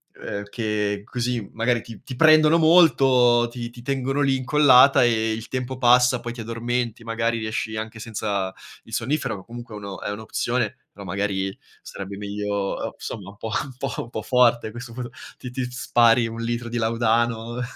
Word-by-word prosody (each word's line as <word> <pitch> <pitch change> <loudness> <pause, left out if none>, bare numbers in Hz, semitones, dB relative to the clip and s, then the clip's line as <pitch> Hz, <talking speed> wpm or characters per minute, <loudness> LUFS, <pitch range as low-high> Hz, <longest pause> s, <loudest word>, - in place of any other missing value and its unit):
uhm, 100 0 -5
che 105 -2 -2
così 120 -3 -3
magari 115 0 +1
ti 115 -2 -12
ti 130 -2 -8
prendono 155 +1 +6
molto, 135 -8 +5
ti 120 0 -6
ti 120 0 -13
tengono 135 +1 -1
lì 135 -1 +3
incollata 130 -1 +6
e 110 -2 +1
il 110 +1 -5
tempo 130 0 -4
passa, 125 0 +4
poi 120 0 -6
ti 120 - -7
addormenti, 115 0 -3
magari 115 0 -1
riesci 110 0 -3
anche 110 +1 -5
senza 100 -4 -3 0.3
il - - -15
sonnifero, 130 -7 -1
che 95 - -13
comunque 120 -1 -9
è - - -6
uno 100 -1 -8
è - - -3
un'opzione, 110 +2 -2
però 100 0 -11
magari 95 0 -2 0.2
sarebbe 100 0 -8
meglio 105 0 -4
o 100 -1 -3
somma 100 -2 -7
un 100 - -14
po' 110 - -6
un 135 -2 -10
po' - - -3
un 120 - -12
po' 110 - -4
forte, 120 -2 +3
a - - -7
questo 120 +1 -9
punto 120 -1 -6 0.3
ti 125 - -8
ti 125 +1 -3
spari 120 -1 +3
un 115 +1 -6
litro 120 +1 -3
di 120 +1 -4
laudano. 115 +1 0
120 Hz, 185 wpm, -23 LUFS, 110-125 Hz, 0.3 s, prendono